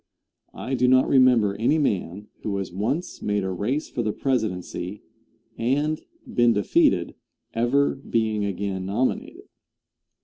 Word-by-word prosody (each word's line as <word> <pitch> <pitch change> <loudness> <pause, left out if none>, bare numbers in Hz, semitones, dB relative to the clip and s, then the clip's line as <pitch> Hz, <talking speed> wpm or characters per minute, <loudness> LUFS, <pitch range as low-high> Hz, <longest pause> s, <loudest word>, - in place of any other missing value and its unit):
I 130 - -5
do 125 -1 +2
not 130 +1 +5
remember 125 -6 +4
any 120 +8 +2
man 100 - -1
who 100 -2 -2
has 95 -3 -4
once 125 - -2
made 105 -1 0
a 95 - -2
race 115 - -2
for 120 - -3
the 110 -2 0
presidency 105 -6 -2 0.6
and 145 +6 0 0.2
been 120 -1 +3
defeated 105 -1 +2 0.4
ever 125 +5 +2
being 110 -5 -1
again 95 -1 -3
nominated. 115 +7 -2
110 Hz, 130 wpm, -24 LUFS, 100-130 Hz, 0.6 s, not